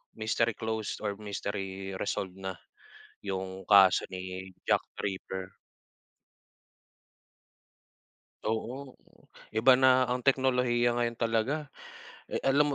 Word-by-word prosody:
mystery 115 Hz, +1 st, 0 dB
closed 110 Hz, -2 st, -3 dB
or 100 Hz, -1 st, -2 dB
mystery 95 Hz, -2 st, -4 dB
resolved 95 Hz, 0 st, -3 dB
na 95 Hz, -1 st, -4 dB, 0.7 s
yung 95 Hz, -1 st, -4 dB
kaso 95 Hz, -3 st, +6 dB
ni 95 Hz, 0 st, -6 dB, 0.2 s
Jack -, -, +3 dB, 0.2 s
Ripper. 95 Hz, -1 st, -4 dB, 2.9 s
Oo, 125 Hz, +5 st, -3 dB, 0.6 s
iba 125 Hz, +4 st, +7 dB
na 130 Hz, 0 st, +6 dB
ang 125 Hz, -, 0 dB
teknolohiya 125 Hz, -3 st, +3 dB
ngayon 120 Hz, -1 st, 0 dB
talaga, 120 Hz, +6 st, 0 dB, 0.6 s
eh, -, -, -3 dB
alam 140 Hz, +1 st, +3 dB
110 Hz, 95 wpm, -30 LUFS, 95-125 Hz, 2.9 s, iba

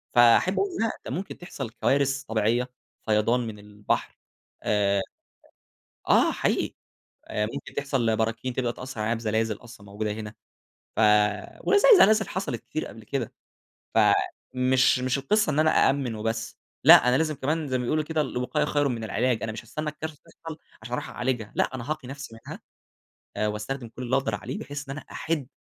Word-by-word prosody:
فأحب 120 Hz, +9 st, +6 dB
أقول 395 Hz, -, +1 dB
لا، 225 Hz, -, +2 dB, 0.2 s
ده -, -, -5 dB
ممكن 185 Hz, +8 st, -4 dB
تحصل 140 Hz, -9 st, -6 dB
كوارث 140 Hz, +3 st, +1 dB
طبيعية، 115 Hz, +3 st, 0 dB, 0.4 s
فيضان 110 Hz, +3 st, +2 dB
من 105 Hz, -2 st, -7 dB
البحر 105 Hz, 0 st, -3 dB, 0.5 s
آآ، 100 Hz, -2 st, +2 dB, 1.1 s
آه، -, -, +5 dB
حقيقي -, -, 0 dB, 0.5 s
آآ، 105 Hz, 0 st, -1 dB
ممكن 140 Hz, -, -7 dB
تحصل 130 Hz, -6 st, 0 dB
براكين 115 Hz, +3 st, -1 dB
تبقى 120 Hz, -2 st, -1 dB
تأثر 130 Hz, -3 st, -8 dB
علينا 115 Hz, +2 st, +1 dB
بزلازل 110 Hz, -1 st, 0 dB
أصلًا 115 Hz, -4 st, -14 dB
موجودة 105 Hz, +1 st, -3 dB
هنا، 105 Hz, 0 st, -6 dB, 0.6 s
ف -, -, -3 dB, 0.6 s
وزي 410 Hz, +4 st, +4 dB
زلازل 215 Hz, -, +5 dB
حصلت 190 Hz, +2 st, -3 dB
كتير 155 Hz, -, -4 dB
قبل 110 Hz, +1 st, -12 dB
كده، 120 Hz, +1 st, -3 dB, 0.6 s
فمش 130 Hz, 0 st, +3 dB
مش 130 Hz, +1 st, 0 dB
القصة 205 Hz, +7 st, +2 dB
إن 150 Hz, -, 0 dB
أنا 155 Hz, 0 st, +4 dB, 0.2 s
أأمن 135 Hz, -4 st, 0 dB
وبس، 115 Hz, +1 st, -3 dB, 0.3 s
لا، 125 Hz, -, +9 dB
أنا 125 Hz, -, +4 dB
لازم 155 Hz, -1 st, 0 dB
كمان 155 Hz, +3 st, -1 dB
زي 130 Hz, -, +1 dB
ما 125 Hz, -, -2 dB
بيقولوا 155 Hz, +5 st, 0 dB
كده: 155 Hz, 0 st, -1 dB
"الوقاية 140 Hz, +2 st, -1 dB
خير 145 Hz, -1 st, +1 dB
من 115 Hz, -3 st, -3 dB
العلاج." 120 Hz, +2 st, 0 dB
أنا 110 Hz, -, -2 dB
مش 110 Hz, -, -7 dB
هاستنى 150 Hz, +7 st, -4 dB
الكارثة 155 Hz, +1 st, -6 dB
تحصل 165 Hz, -1 st, -10 dB, 0.2 s
عشان 115 Hz, +2 st, -7 dB
أروح -, -, -3 dB
أعالجها، 125 Hz, -4 st, -2 dB
لأ، -, -, 0 dB
أنا 130 Hz, +2 st, -7 dB
هاقي 155 Hz, -5 st, -4 dB
نفسي 135 Hz, -4 st, -8 dB
منها -, -, -7 dB, 0.8 s
آآ، 105 Hz, -, +1 dB
وأستخدم 115 Hz, +4 st, -4 dB
كل 120 Hz, +3 st, -9 dB
اللي 125 Hz, +1 st, -1 dB
أنا -, -, +4 dB
أقدر 110 Hz, -4 st, -2 dB
عليه 125 Hz, +6 st, -5 dB
بحيث 145 Hz, -1 st, -7 dB
إن 140 Hz, -, -4 dB
أنا -, -, -11 dB
أِحد 150 Hz, -6 st, -2 dB
125 Hz, 175 wpm, -26 LUFS, 110-145 Hz, 1.1 s, لا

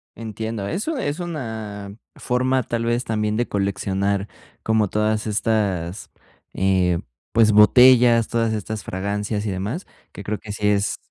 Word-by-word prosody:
Entiendo, 110 Hz, -2 st, -5 dB
eso 225 Hz, -, -2 dB
es 150 Hz, -, -2 dB
una 110 Hz, -, -6 dB, 0.2 s
forma, 130 Hz, +1 st, 0 dB
tal 115 Hz, 0 st, -3 dB
vez, 120 Hz, +1 st, 0 dB
también 105 Hz, -1 st, -1 dB
de 120 Hz, -, 0 dB
coleccionar, 100 Hz, 0 st, -1 dB, 0.3 s
como 110 Hz, -2 st, +1 dB
todas 105 Hz, +1 st, 0 dB
estas, 100 Hz, -5 st, -1 dB, 0.4 s
eh, 95 Hz, -2 st, +2 dB, 0.3 s
pues, 110 Hz, -1 st, +4 dB
botellas, 120 Hz, +2 st, +6 dB
todas 115 Hz, -1 st, 0 dB
estas 110 Hz, 0 st, -4 dB
fragancias 105 Hz, +2 st, -3 dB
y 105 Hz, -, -1 dB
demás, 100 Hz, -, -4 dB, 0.2 s
que 100 Hz, -, -9 dB
creo, 105 Hz, +2 st, -3 dB
que 105 Hz, -, -9 dB
sí 105 Hz, 0 st, -1 dB
es, 100 Hz, -1 st, +1 dB
105 Hz, 140 wpm, -22 LUFS, 100-115 Hz, 0.4 s, botellas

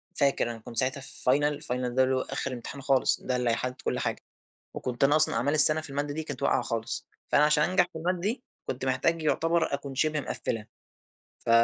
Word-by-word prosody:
فاكر 140 Hz, -4 st, +2 dB
أنا 115 Hz, -, -8 dB
كنت 115 Hz, +1 st, -11 dB
ساعتها 130 Hz, +3 st, 0 dB
في 130 Hz, -1 st, -1 dB
final، 145 Hz, +2 st, +1 dB
الfinal 125 Hz, -2 st, -2 dB
ده 130 Hz, -, +5 dB
اللي 130 Hz, 0 st, +2 dB
هو 130 Hz, -, +1 dB
آخر 135 Hz, -, -3 dB
امتحان 130 Hz, +3 st, -7 dB
خالص 135 Hz, 0 st, +2 dB
ده 130 Hz, -, -1 dB
اللي 125 Hz, -1 st, +1 dB
هيحدد 125 Hz, +2 st, -2 dB
كل -, -, -1 dB
حاجة، -, -, -2 dB, 0.5 s
وكنت 125 Hz, +1 st, -1 dB
أنا 145 Hz, +2 st, +5 dB
أصلًا 155 Hz, -, +4 dB
أعمال 145 Hz, +4 st, +1 dB
السَنة 155 Hz, +1 st, +5 dB
في 155 Hz, -, -9 dB
المادة 145 Hz, +1 st, -2 dB
دي 160 Hz, +1 st, -3 dB
كنت 140 Hz, -5 st, -6 dB
واقعة -, -, +2 dB
خالص، 115 Hz, -1 st, -3 dB, 0.2 s
فأنا 150 Hz, -, +6 dB
عشان 150 Hz, 0 st, +4 dB
أنجح 185 Hz, -, +4 dB
في -, -, -6 dB
المادة 175 Hz, +2 st, -1 dB
دي 220 Hz, +7 st, -2 dB, 0.2 s
كنت 130 Hz, +1 st, -3 dB
محتاج 135 Hz, +6 st, +1 dB
يعتبر 165 Hz, +1 st, +1 dB
أكون 140 Hz, -1 st, -5 dB
شِبه 155 Hz, +2 st, +1 dB
مقفلها، 115 Hz, -5 st, -3 dB, 0.7 s
ف -, -, -4 dB
140 Hz, 215 wpm, -28 LUFS, 130-155 Hz, 0.7 s, فأنا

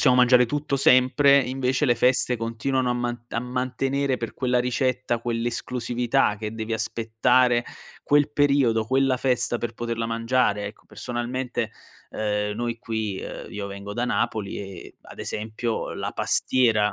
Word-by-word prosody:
possiamo 125 Hz, -3 st, +5 dB
mangiare 125 Hz, 0 st, +6 dB
tutto 140 Hz, +2 st, -2 dB
sempre, 135 Hz, +2 st, +5 dB
invece 130 Hz, +2 st, 0 dB
le 120 Hz, -, +4 dB
feste 125 Hz, +1 st, +2 dB
continuano 120 Hz, +3 st, -1 dB
a -, -, +3 dB
man 120 Hz, -1 st, -3 dB
a 115 Hz, -, -2 dB
mantenere 130 Hz, +2 st, -1 dB
per 115 Hz, -, -5 dB
quella 125 Hz, -1 st, +1 dB
ricetta 125 Hz, -1 st, 0 dB
quell'esclusività 120 Hz, 0 st, 0 dB
che 105 Hz, +1 st, -5 dB
devi 110 Hz, 0 st, -4 dB
aspettare 115 Hz, +2 st, +2 dB, 0.4 s
quel 145 Hz, 0 st, +3 dB
periodo, 140 Hz, -7 st, +3 dB
quella 130 Hz, +1 st, +2 dB
festa 125 Hz, -2 st, 0 dB
per 115 Hz, -1 st, -4 dB
poterla 115 Hz, -1 st, -3 dB
mangiare, 115 Hz, -2 st, +1 dB
ecco. 105 Hz, -, -10 dB
Personalmente, 120 Hz, -1 st, -3 dB, 0.4 s
ehm, 105 Hz, -1 st, -1 dB
noi 120 Hz, 0 st, -3 dB
qui, 110 Hz, -4 st, -3 dB
ehm, -, -, -7 dB
io 100 Hz, -1 st, -5 dB
vengo 100 Hz, +1 st, -7 dB
da 120 Hz, +2 st, 0 dB
Napoli 105 Hz, -4 st, -1 dB
e 95 Hz, -3 st, -9 dB
ad -, -, -12 dB
esempio 110 Hz, +2 st, -3 dB
la -, -, -3 dB
pastiera 110 Hz, -5 st, +2 dB
120 Hz, 145 wpm, -24 LUFS, 115-130 Hz, 0.4 s, mangiare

